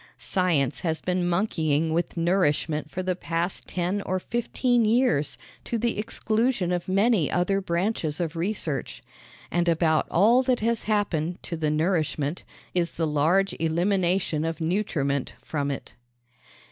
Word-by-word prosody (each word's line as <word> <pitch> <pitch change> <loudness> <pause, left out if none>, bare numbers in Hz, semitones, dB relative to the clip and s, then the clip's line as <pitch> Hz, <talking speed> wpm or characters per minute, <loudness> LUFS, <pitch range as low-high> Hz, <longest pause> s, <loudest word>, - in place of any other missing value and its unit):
Science 170 -8 +1
has 160 -3 -1
been 180 -1 0
monkeying 160 -4 +1
with 170 +1 -1
nourishment 160 -4 +1
for 185 +4 -4
the 185 0 0
past 170 +1 -3
ten 185 +3 -1
or 185 -1 -1
fifteen 240 +3 0
years 220 - +2 0.3
to 235 - -2
the 235 -1 -1
exclusion 220 -2 0
of 175 -1 -2
many 195 - +3
other 195 +3 +1
branches 170 -3 -1
of 170 -2 -2
research; 165 -5 -3 0.5
and 175 0 +2
about 160 -1 +2
all 225 +8 +5
that 255 -1 +1
has 230 0 0
happened 180 -6 0
to 170 - -4
the 155 -2 -1
nourishment 155 -1 0 0.3
is 175 -2 0
the 165 - -1
large 160 +6 +2
elimination 175 -1 +1
of 165 0 -2
nutriment 160 -6 -1
from 145 -2 -3
it. 140 - -5
175 Hz, 140 wpm, -26 LUFS, 160-200 Hz, 0.5 s, all